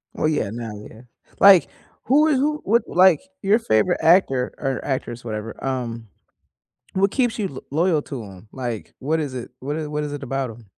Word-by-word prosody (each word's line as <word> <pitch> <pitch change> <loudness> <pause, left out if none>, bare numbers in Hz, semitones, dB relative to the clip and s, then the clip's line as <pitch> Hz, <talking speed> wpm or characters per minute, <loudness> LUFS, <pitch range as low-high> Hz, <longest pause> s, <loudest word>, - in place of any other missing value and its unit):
Oh - - -1
yeah, 155 -9 0
now 115 -1 -6 0.2
yeah. 110 - -14 0.4
Like, 195 -3 +8 0.4
who 295 +5 +4
is 295 -4 +3
who 300 +2 0
would 230 +2 +3
like, 185 -1 +5 0.2
your 210 +3 +3
favorite 175 - +1
actor 160 -7 +3
or 135 -2 -3
actress, 125 -3 -4
whatever, 110 0 -6
um, 120 -4 -3 0.9
what 195 +1 +2
keeps 240 -1 0
you 210 - -1
l 130 - -9
loyal 160 0 +2
to 130 -6 -6
'em? 95 +1 -13
Like, 120 -5 -5
what 155 +4 0
is 145 -4 -3
it 125 -1 -6
what 145 +3 -4
is 155 -1 -3
what 150 0 -3
is 150 - -4
it 145 -1 -6
about 135 0 -2
'em? 115 -1 -13
145 Hz, 195 wpm, -22 LUFS, 120-190 Hz, 0.9 s, Like